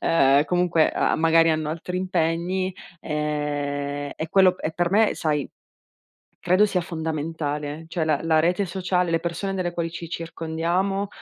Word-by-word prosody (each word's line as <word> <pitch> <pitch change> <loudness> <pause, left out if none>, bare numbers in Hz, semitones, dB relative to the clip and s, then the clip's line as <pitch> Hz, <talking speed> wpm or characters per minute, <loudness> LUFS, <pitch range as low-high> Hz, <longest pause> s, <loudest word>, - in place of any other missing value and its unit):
ehm, 140 -2 +4
comunque, 175 -1 +2
uhm, - - +1
magari 165 0 +5
hanno 155 -1 -1
altri 170 +3 -4
impegni 185 +1 -1 0.3
e 145 -2 -3
e 160 - -4
quello 190 -2 +5
p - - -18
e 160 - -1
per 175 +1 0
me 215 +2 +3
sai, 150 -4 -1 0.9
credo 185 +4 +4
sia 185 -3 0
fondamentale, 160 -2 -4
cioè 165 -1 -1
la 155 -2 +1
la 160 -1 +3
rete 180 +5 +1
sociale, 180 -1 -1
le 165 - +1
persone 175 +3 -3
delle 180 -2 -2
quali 170 -1 -2
ci 170 0 -7
circondiamo, 170 +4 -2
165 Hz, 155 wpm, -24 LUFS, 155-180 Hz, 0.9 s, magari